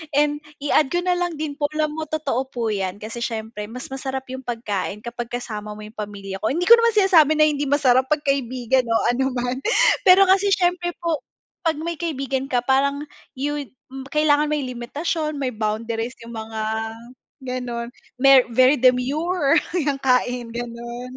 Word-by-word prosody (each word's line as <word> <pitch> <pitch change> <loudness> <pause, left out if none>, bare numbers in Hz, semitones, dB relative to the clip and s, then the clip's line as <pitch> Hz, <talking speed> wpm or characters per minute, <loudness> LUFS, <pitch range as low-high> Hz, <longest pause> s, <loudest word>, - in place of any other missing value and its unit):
And 295 0 +2 0.2
i-add 295 0 +3
ko 350 +4 -1
na 360 -1 +1
lang 350 -2 -1
din 300 -1 -5
po, 290 - +2
alam 305 -1 0
mo 315 +1 -5
totoo 280 -4 -2
po 235 -4 -2
'yan 195 -2 -2
kasi 215 +3 -7
siyempre 220 -2 -4
mas 250 +4 -9
masarap 265 0 -4
yung 260 - -5
pagkain 215 -4 -4
kapag 240 0 -5
kasama 215 -3 -5
mo 215 - -10
yung 215 +1 -12
pamilya 200 -2 -6
ko, 215 - -1
hindi 335 +9 0
ko 465 +5 +8
naman 465 -1 +2
sinasabi 335 -7 +5
na 305 - +5
hindi 290 -2 +1
masarap 265 -2 +3
'pag 300 +1 0
kaibigan 255 -2 0
o 230 - +1 0.2
ano 265 +1 -1
man. 245 +1 -2 0.5
Pero 375 +1 +8
kasi 395 +1 +3
siyempre 355 -2 +1
po, 325 -4 -2 0.4
'pag 320 - +2
may 330 +2 -5
kaibigan 275 -5 -2
ka 245 -3 0
parang 280 +2 +1 0.3
yun 285 +1 -3 0.5
kailangan 300 0 +3
may 300 -1 -1
limitasyon, 295 +6 -3
may 270 -3 -2
boundaries 225 +2 -3
yung 235 - -10
mga 220 0 -5 0.8
gano'n. 250 -2 -4 0.3
Mer 275 -2 +7
very 255 +4 +5
demure 275 +6 +2 0.2
yung 290 -6 0
kain, 250 -3 0
ganun. 240 +1 -6
265 Hz, 170 wpm, -22 LUFS, 235-300 Hz, 0.8 s, ko